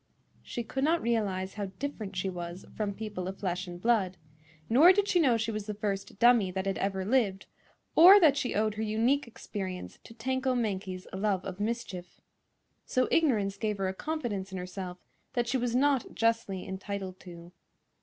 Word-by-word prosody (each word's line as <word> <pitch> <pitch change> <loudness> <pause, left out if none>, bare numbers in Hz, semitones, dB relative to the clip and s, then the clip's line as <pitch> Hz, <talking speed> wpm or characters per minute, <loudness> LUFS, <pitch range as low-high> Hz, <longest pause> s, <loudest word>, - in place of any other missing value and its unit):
She 240 - -5
could 265 +4 -3
not 330 +3 +3
realize 200 -6 -1
how 205 -1 -3
different 220 -8 -5
she 185 +1 -1
was 175 0 -6
from 205 -2 -2
people 210 -4 -5
of 190 +1 -5
flesh 185 -1 -3
and 175 0 -8
blood; 200 -4 +1 0.5
nor 290 +11 +7
did 405 +1 +2
she 360 - +3
know 260 -8 +4
she 225 0 -1
was 215 -1 -5
the 210 - -3
first 200 -2 -3
dummy 235 -4 +5
that 190 +1 -3
had 195 -1 -1
ever 190 -1 -1
lived, 205 -5 +1 0.5
or 370 +5 +10
that 310 -7 +5
she 255 -3 -2
owed 215 +1 +1
her 215 - -5
unique 230 +6 +1
experience 190 -5 -6
to 230 - -12
Tanko 260 +2 -1
Mankie's 190 -5 -2
love 195 -1 0
of 190 -1 -6
mischief. 205 -5 -4 0.6
So 255 0 +1
ignorance 210 -11 +2
gave 210 0 -1
her 190 -1 -1
a - - -3
confidence 210 -8 -3
in 190 - -5
herself 180 0 -6 0.4
that 240 -2 0
she 260 - +1
was 245 -1 -1
not 275 -1 +2
justly 225 -5 0
entitled 190 -1 -5
to. 170 -2 -11
210 Hz, 185 wpm, -30 LUFS, 190-240 Hz, 0.6 s, or